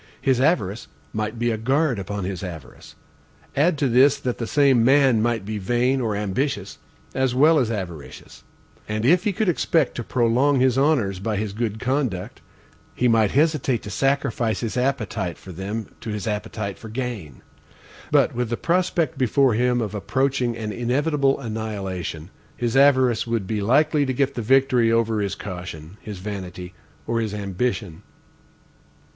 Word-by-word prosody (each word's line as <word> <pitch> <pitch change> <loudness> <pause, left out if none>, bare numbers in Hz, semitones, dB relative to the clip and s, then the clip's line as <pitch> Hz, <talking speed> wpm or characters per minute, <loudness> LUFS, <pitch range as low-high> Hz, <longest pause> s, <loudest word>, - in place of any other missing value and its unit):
His 130 -2 +1
avarice 120 - +1 0.3
might 110 +1 -3
be 120 +1 0
a 110 - -2
guard 135 +1 +1
upon 100 +1 -4
his 95 -1 -4
avarice. 85 -8 -9 0.6
Add 155 +3 +3
to 140 -1 +1
this 130 +4 +5
that 125 -3 -3
the 115 - -3
same 135 -4 +4
man 135 -3 +4
might 115 -3 0
be 105 0 -4
vain 120 +6 +1
or 110 -4 -1
ambitious, 105 0 -2 0.3
as 130 -2 0
well 155 +4 +5
as 120 -4 +1
avaricious. 90 -9 -7 0.5
And 110 +1 -2
if 175 +7 +4
he 210 - +2
could 210 +2 -1
expect 165 -3 +1
to 120 - -5
prolong 125 +4 +2
his 130 -1 +3
honors 130 -10 +1
by 105 +1 -2
his 105 -1 -3
good 110 -1 -3
conduct, 125 -9 -2 0.5
he 125 - +2
might 115 -3 +4
hesitate 140 -4 +1
to 105 - -7
sacrifice 135 -5 0
his 115 -3 -3
appetite 115 -8 -1
for 95 - -11
them 100 +5 -4 0.2
to - - -6
his 105 -2 -4
appetite 105 -1 -4
for 110 - -9
gain. 110 - -5 0.7
But - - +3
with 125 -1 -2
the 120 - -2
prospect 170 -3 0
before 130 0 +3
him 125 +2 +1
of 110 -2 -3
approaching 125 +2 0
an 110 -2 -4
inevitable 135 +4 +1
annihilation, 100 - -5 0.3
his 120 0 -1
avarice 130 -4 +4
would 115 -4 -1
be 105 +1 -2
likely 145 +6 +3
to 130 - 0
get 140 +1 0
the 120 - -4
victory 125 -1 +3
over 115 -2 +1
his 100 -1 -2
caution, 90 -3 -8
his 105 -2 -7
vanity, 90 -2 -7 0.3
or 115 0 -1
his 105 -2 -3
ambition. 100 -2 -3
115 Hz, 165 wpm, -23 LUFS, 105-135 Hz, 0.7 s, this